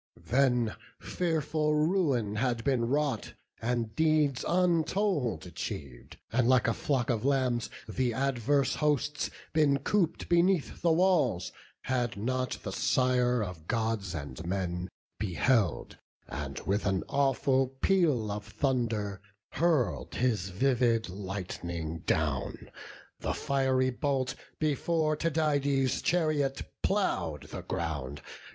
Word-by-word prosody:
Then 125 -3 +2 0.2
fearful 155 -3 0
ruin 150 - +1
had 120 -1 0
been 130 -4 +2
wrought, 135 -2 -1 0.3
and 115 -1 -1
deeds 155 -4 +2
Untold 175 - +1
achiev'd, 65 -4 -7
and 120 +1 +2
like 130 -2 +4
a 115 - +2
flock 130 -3 0
of 110 -3 -1
lambs, 130 -4 +1 0.2
The 125 +3 0
adverse 135 +2 +1
hosts 150 0 0 0.2
been 150 -3 +4
coop'd 175 +5 0
beneath 175 -1 +2
the 170 - +3
walls, 160 - +2 0.3
Had 120 -4 -1
not 130 +4 -1
the - - -4
Sire 125 -2 +2
of 90 -5 -7
Gods 110 -5 -1
and 70 -1 -6
men 90 0 -2 0.3
beheld, 95 - +1 0.3
And 70 0 -5
with 100 +2 0
an 95 -2 +1
awful 135 -1 +2
peal 135 - +1
of 105 0 -4
thunder 110 -4 -1 0.3
hurl'd 160 -6 +1
His 110 -7 0
vivid 115 +1 +2
lightning 90 -4 -5
down; - - -1 0.5
the - - -2
fiery 130 -1 +1
bolt 135 0 -1 0.2
Before 155 +1 +1
Tydides' 145 -4 +1
chariot 155 -5 +1 0.2
plough'd 80 - 0
the 90 - -6
ground. 80 -6 -4
130 Hz, 115 wpm, -30 LUFS, 105-145 Hz, 0.5 s, like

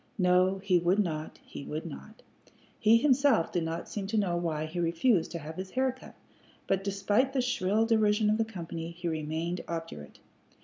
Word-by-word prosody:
No, 185 0 +3
he 185 -3 +3
would 175 +3 +2
not, 160 -6 -2
he - - -8
would 155 +3 -5
not. 70 0 -10 0.6
He 220 +2 +6
himself 275 - +3
did 175 - 0
not 165 +1 -4
seem 200 -2 -4
to 220 +2 -1
know 190 -4 +1
why 160 -3 -1
he 165 +3 -5
refused 170 +4 +2
to - - -2
have 160 0 -8
his 185 0 -5
hair 260 +5 +1
cut, 260 - -14 0.5
but, 195 0 0
despite 205 +6 +1
the 265 - +2
shrill 220 -3 +1
derision 215 -1 +3
of 215 - +1
the - - +4
company, 170 -5 -6
he 170 +1 -6
remained 160 +2 -2
obdurate. 165 - -6
180 Hz, 185 wpm, -29 LUFS, 165-215 Hz, 0.6 s, He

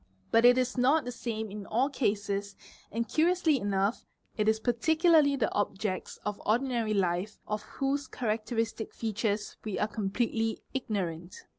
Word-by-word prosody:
But 230 +1 +5
it 245 +1 +7
is 255 0 0
not 275 +4 +4
the 245 - -3
same 220 -3 -4
in 205 -1 -7
all 245 +5 +2
cases 200 -6 -1 0.4
and 230 +2 -1
curiously 325 -3 +3
enough 200 +1 0 0.3
it 215 -1 +2
is 220 0 +2
particularly 305 +5 +4
the 250 -5 0
objects 200 -1 -2
of 210 -1 -3
ordinary 230 -1 +1
life 185 +2 0
of 210 0 -2
whose 275 +4 -2
characteristic 225 -1 -2
features 215 -1 -2
we 215 -3 -3
are 210 - +1
completely 225 +2 -1
ignorant. 185 -9 -3
220 Hz, 145 wpm, -30 LUFS, 205-255 Hz, 0.4 s, it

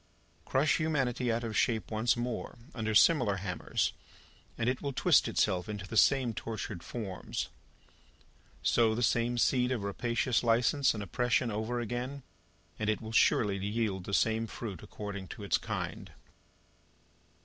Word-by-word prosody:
Crush 140 +4 +2
humanity 135 -6 0
out 115 +1 -1
of 110 -2 -4
shape 110 0 +1
once 110 +2 +1
more, 120 +1 -4 0.2
under 110 -2 -2
similar 125 -5 +5
hammers, 95 -2 -2 0.6
and 115 - -1
it 125 +1 0
will 140 -1 -3
twist - - +4
itself 90 +2 0
into 105 -2 -5
the 110 - -6
same 130 0 +4
tortured 110 -4 -5
forms. 100 -4 -5 1.1
Sow 115 -2 +3
the 120 - -1
same 120 +2 +1
seed 125 +1 +2
of 120 -6 -1
rapacious 120 +5 0
license 120 +3 +3
and 105 - -4
oppression 120 +5 0
over 110 +3 -2
again, 125 +4 -4 0.6
and 110 0 0
it 110 - +1
will 110 0 -7
surely 105 -2 +3
yield 100 -2 -2
the 100 - -6
same 115 0 +1
fruit 105 -6 -6
according 100 -2 -7
to 105 - -8
its 100 -5 +1
kind. - - -5
115 Hz, 150 wpm, -31 LUFS, 105-125 Hz, 1.1 s, similar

